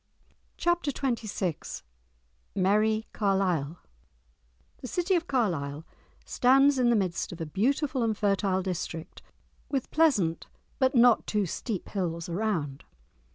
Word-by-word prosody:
*Chapter 345 -4 +1
XXVI* 215 - -3 0.7
*Merrie 215 +3 +2
Carlisle* 185 -7 0 1.0
The 255 - -7
city 355 - 0
of 345 -1 +1
Carlisle 160 - -1 0.4
stands 270 +2 +4
in 245 -1 +4
the 235 - +4
midst 185 -5 -1
of 175 - -8
a 165 - -3
beautiful 260 - 0
and 220 -2 0
fertile 195 -2 +1
district 170 -3 -5 0.5
with 270 -3 -2
pleasant 235 - +2 0.3
but 260 0 +2
not 240 -1 +5
too 210 -2 +1
steep 195 +3 -4
hills 170 -4 -3
around. 170 -7 -2
210 Hz, 115 wpm, -28 LUFS, 175-255 Hz, 1.0 s, not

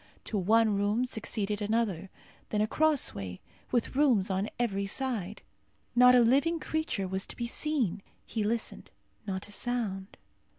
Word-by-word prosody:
To - - -5
one 215 +3 +3
room 205 +5 +1
succeeded 210 -3 -2
another. 205 -4 0 0.4
Then 210 - 0
a 210 - +3
crossway, 215 - 0 0.3
with 240 +1 0
rooms 245 -9 +3
on 190 +3 -1
every 200 -5 -1
side. 215 -5 -3 0.5
Not 250 +1 +8
a 245 - +7
living 280 +8 +3
creature 315 -13 -2
was 190 +1 -2
to - - -7
be 240 - -3
seen. 235 - -1 0.2
He 220 - -2
listened. 225 +2 -2 0.4
Not 190 0 -3
a - - -12
sound. 205 -4 -3
220 Hz, 145 wpm, -30 LUFS, 195-250 Hz, 0.5 s, Not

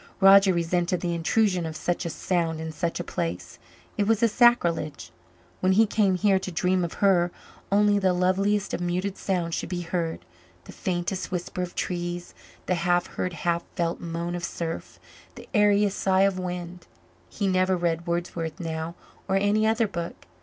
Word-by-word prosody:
Roger 195 0 +7
resented 175 +1 0
the 175 -1 -1
intrusion 180 +2 +1
of 160 -1 -5
such 175 +1 -2
a - - -3
sound 165 0 -1
in 160 0 -4
such 165 +2 -2
a - - -2
place 85 0 -4 0.4
it 205 - +2
was 225 0 +2
a - - +7
sacrilege. 215 - +2 0.5
When 185 +1 +3
he 220 +4 +5
came 205 -3 +2
here 195 0 +3
to 190 - -6
dream 180 +2 +1
of 170 - -3
her, 175 -3 +4 0.4
only 205 0 +4
the 190 -2 +3
loveliest 190 +3 +1
of - - -2
muted 180 +3 -1
sounds 175 -4 -2
should - - -3
be 180 -1 -3
heard 170 -1 -3 0.4
the - - -11
faintest 180 0 -3
whisper 180 0 -4
of 180 -1 -5
trees, 175 -1 -3 0.3
the - - +1
half 175 0 +1
heard, 180 - -2
half 170 0 -1
felt 170 -2 -1
moan 170 +1 -3
of 175 0 -4
surf, 165 -1 -5 0.4
the - - -11
airiest 205 -2 +3
sigh 190 0 +3
of 195 -1 +2
wind. 180 -1 -6 0.4
He 205 - -3
never 185 0 +2
read 170 0 -1
Wordsworth 170 -2 -3
now 165 0 -4 0.3
or 190 - +1
any 205 +2 +2
other 225 0 +2
book. 170 -4 -6
180 Hz, 175 wpm, -26 LUFS, 170-195 Hz, 0.5 s, Roger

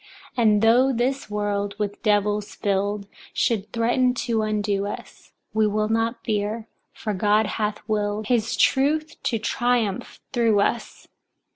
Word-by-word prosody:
3. 245 - 0
And 210 -2 +4
though 245 +4 +5
this 260 +1 -1
world, 205 -1 -2
with 205 -1 -3
devils 210 -1 +1
filled, 200 0 -1 0.3
should 215 -5 0
threaten 245 +2 +2
to 230 -2 0
undo 205 -2 0
us, 205 - -9 0.2
we 215 0 +3
will 215 +1 0
not 225 +1 0
fear, 215 +1 -1 0.2
for 215 - -4
God 210 +3 +3
hath 210 0 -3
willed 210 0 -1
his 235 0 +1
truth 305 +4 +2
to 230 - 0
triumph 235 -2 -1
through 230 -4 +3
us. 235 +4 -1
215 Hz, 140 wpm, -24 LUFS, 205-235 Hz, 0.3 s, though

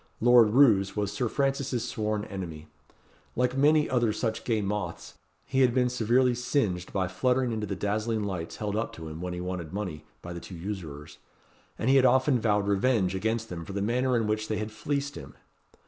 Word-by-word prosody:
Lord 120 -2 +6
Roos 105 -6 +4
was 105 -1 -1
Sir 125 -4 -1
Francis's 135 -3 -1
sworn 105 -3 -2
enemy. 85 -6 -7 0.7
Like 125 +1 +1
many 150 +2 +4
other 120 -3 +2
such 110 +1 -2
gay 115 -3 +1
moths, 100 -4 -4 0.3
he 135 0 +1
had 125 -1 +4
been 125 -1 +3
severely 125 +1 +2
singed 115 -8 -1
by 95 -2 0
fluttering 125 +6 +1
into 110 -2 -3
the 100 - -3
dazzling 110 +2 -1
lights 90 -5 -4
held 105 -1 -3
up 110 +2 -2
to 80 -1 -8
him, 80 +2 -8
when 90 0 -4
he 90 - -5
wanted 90 -3 -5
money, 90 -7 -4 0.2
by 85 - -6
the 85 - -6
two 90 - -10
usurers; 85 -6 -7 0.6
and 115 - -2
he 135 +1 +6
had 130 - +5
often 130 -1 +3
vowed 105 -2 +1
revenge 100 -2 +2
against 110 +3 -1
them 85 -2 -6
for 100 - -8
the 100 - -2
manner 125 +3 +1
in 115 - 0
which 110 0 -1
they 110 - -1
had 110 +1 -4
fleeced 140 +6 -2
him. 70 +1 -10
110 Hz, 200 wpm, -28 LUFS, 95-125 Hz, 0.7 s, Lord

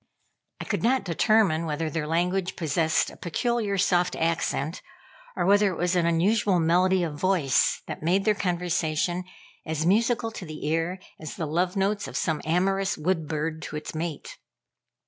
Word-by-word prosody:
I - - -5
could - - -2
not 255 +3 +2
determine 175 -2 +2
whether 155 +1 -2
their 155 0 -3
language 180 +3 0
possessed 160 0 +1
a - - -14
peculiarly 215 +2 -1
soft 180 -2 +2
accent, 165 -1 -1 0.5
or - - 0
whether 200 +1 +4
it 180 - -6
was 180 +1 0
an 170 -2 +2
unusual 185 +3 +2
melody 180 +3 +3
of 160 -3 -2
voice 180 -8 +2
that - - -7
made 180 +5 +1
their 215 - +4
conversation 175 -2 -1 0.4
as 160 0 -2
musical 225 +4 +2
to 220 - -8
the 155 -1 -7
ear 165 +4 0 0.2
as 155 -2 -7
the 165 - -3
love 175 +5 0
notes 200 +1 0
of - - -5
some 160 -3 -1
amorous 190 +4 +1
wood 160 0 -1
bird 160 +1 -3
to 155 - -7
its 150 - -5
mate. 160 -1 -5
175 Hz, 165 wpm, -26 LUFS, 160-195 Hz, 0.5 s, whether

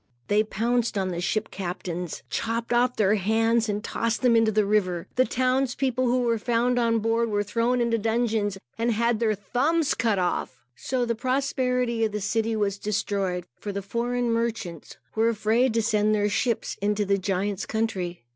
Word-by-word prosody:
They 210 +1 +4
pounced 230 +1 0
on 190 -1 0
the 175 -1 -3
ship 215 +4 -1
captains, 180 -2 -5
chopped 230 +1 -2
off 245 +1 +2
their 205 -1 +3
hands 225 +3 +2
and 205 +1 -2
tossed 230 +2 -2
them 245 -2 +5
into 225 -1 +4
the 215 -1 +2
river. 185 -5 +1
The 255 0 +4
townspeople, 255 0 0
who 250 +1 +2
were 230 -2 +1
found 240 +2 +1
on 230 -1 +2
board, 225 +1 +1
were 205 -1 0
thrown 230 +4 0
into 235 -1 +1
the - - -5
dungeons 220 -3 0 0.2
and 235 +1 +2
had 235 0 +1
their 220 -2 +2
thumbs 275 - +1
cut 225 -3 +1
off. 175 -8 -2
So 250 - -1
the 235 - 0
prosperity 250 -1 0
of 215 -2 0
the 210 - -1
city 225 +2 0
was 205 -2 -1
destroyed, 195 -4 -1
for 205 - -4
the 200 0 -4
foreign 240 +3 -1
merchants 225 -8 -3 0.2
were 225 +1 +2
afraid 230 +3 +2
to 230 - +2
send 215 -1 +2
their 205 0 +1
ships 235 +2 -1
into 205 0 +1
the 200 0 +1
giant's 195 +1 -2
country. 190 - -2
225 Hz, 185 wpm, -25 LUFS, 205-235 Hz, 0.2 s, them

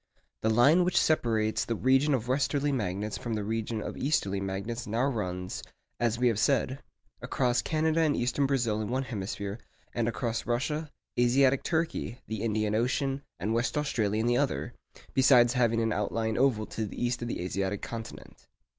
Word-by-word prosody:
The 110 - +1
line 140 +11 +5
which 180 0 +1
separates 110 -8 +1
the 115 - -2
region 135 +5 +3
of 120 -2 -3
westerly 145 +2 +1
magnets 105 -4 -2
from 115 -2 -3
the 105 - -2
region 110 +1 -2
of - - -5
easterly 100 -9 0
magnets 100 +5 -4
now 115 +5 +1
runs, 90 -8 -3 0.4
as 120 -1 +1
we 125 +1 +3
have 115 -3 +1
said, 130 +2 +1 0.4
across 125 -2 +1
Canada 160 +1 +1
and 155 -3 +3
eastern 125 +3 +1
Brazil 120 -6 0
in 105 - -3
one 130 +2 0
hemisphere, 100 -2 -4 0.3
and 115 -1 0
across 115 0 -2
Russia, 150 +6 -1 0.3
Asiatic 130 +2 +4
Turkey, 160 -8 -1
the 110 -1 -4
Indian 110 -2 0
Ocean, 135 +4 0 0.2
and 105 +6 -1
West 120 +6 0
Australia 110 -8 0
in 110 - 0
the 120 0 +3
other, 125 -3 -1 0.4
besides 125 -2 +5
having 120 -3 +2
an 115 -1 +1
outlying 110 +2 -1
oval 120 -4 +2
to 110 +1 -4
the - - -8
east 120 0 -1
of 120 - -3
the - - -3
Asiatic 95 +2 -2
continent. 115 0 -8
120 Hz, 175 wpm, -29 LUFS, 110-135 Hz, 0.4 s, line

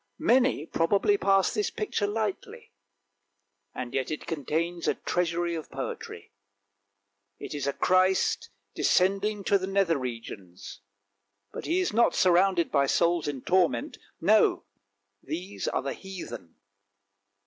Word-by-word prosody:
Many 250 - +2
probably 200 - +2
pass 195 - +2
this 210 -2 0
picture 210 -1 -2
lightly, 210 -1 -4 1.0
and 125 -1 -5
yet 130 -1 -1
it 155 - -5
contains 165 +3 -2
a - - +2
treasury 175 -1 -1
of 160 -2 -6
poetry; - - -7 1.1
it - - -7
is 145 -2 -3
a 140 - 0
Christ 185 +1 +2 0.2
descending 200 +2 +1
to 200 +1 +3
the 190 - -4
nether 195 -6 +1
regions, 115 -7 -8 0.7
but - - -6
He 345 +3 +1
is 370 - -1
not 235 +2 +3
surrounded 180 -1 +3
by 140 -2 +3
souls 170 +2 +2
in 140 -3 -4
torment, 175 -10 +1 0.2
no, - - +3 0.6
these 175 +7 -5
are - - -1
the 135 - -3
heathen. 175 - -9
175 Hz, 125 wpm, -27 LUFS, 145-195 Hz, 1.1 s, to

